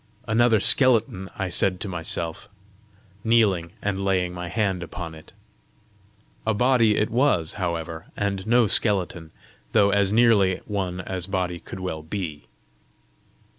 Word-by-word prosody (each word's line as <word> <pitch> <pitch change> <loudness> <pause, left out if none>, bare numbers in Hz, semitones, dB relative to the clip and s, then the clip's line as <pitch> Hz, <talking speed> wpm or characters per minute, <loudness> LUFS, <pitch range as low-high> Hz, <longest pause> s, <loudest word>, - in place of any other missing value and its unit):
"Another 115 0 +3
skeleton!" 115 -7 +3
I 95 -4 -2
said 90 +1 +4
to - - -3
myself, 85 0 -3 0.7
kneeling 100 -7 +2
and 100 -1 -2
laying 90 -2 0
my 90 0 -6
hand 95 0 -1
upon 85 -1 -7
it. 80 0 -14 1.1
A 110 -1 0
body 115 -2 +3
it 105 - 0
was, 120 - +1
however, 85 -2 -4
and 100 -1 -2
no 120 +1 +4
skeleton, 95 -6 0 0.4
though 100 -2 +4
as 100 -1 +2
nearly 105 -5 +4
one 95 -3 -3
as 90 -1 -5
body 90 -3 -2
could 95 +3 -9
well 85 -4 -4
be. 80 -5 -6
95 Hz, 135 wpm, -24 LUFS, 90-105 Hz, 1.1 s, said